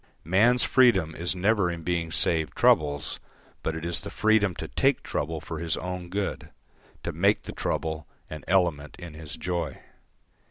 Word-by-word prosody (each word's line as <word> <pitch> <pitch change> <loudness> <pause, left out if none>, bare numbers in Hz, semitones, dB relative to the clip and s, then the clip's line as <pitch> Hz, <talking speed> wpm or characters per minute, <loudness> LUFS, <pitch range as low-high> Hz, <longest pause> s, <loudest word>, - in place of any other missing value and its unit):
Man's 110 +9 +4
freedom 105 -11 +4
is 90 +2 -1
never 100 0 +2
in 85 -1 -5
being 85 -1 -1
saved 80 -3 +1
troubles, 75 -2 +2 0.4
but 80 - -2
it 80 +1 -5
is 85 -1 +1
the 100 - -7
freedom 105 -4 +2
to - - -5
take - - +1
trouble 80 +2 -2
for 80 +1 -6
his 85 -1 -1
own 90 -1 -5
good, 100 +1 -3 0.5
to - - -2
make - - +2
the - - -6
trouble 80 -2 -3 0.2
an 75 -2 -8
element 85 -6 +1
in 85 -3 -9
his 75 -1 -7
joy. 90 -1 -3
85 Hz, 165 wpm, -27 LUFS, 80-95 Hz, 0.5 s, Man's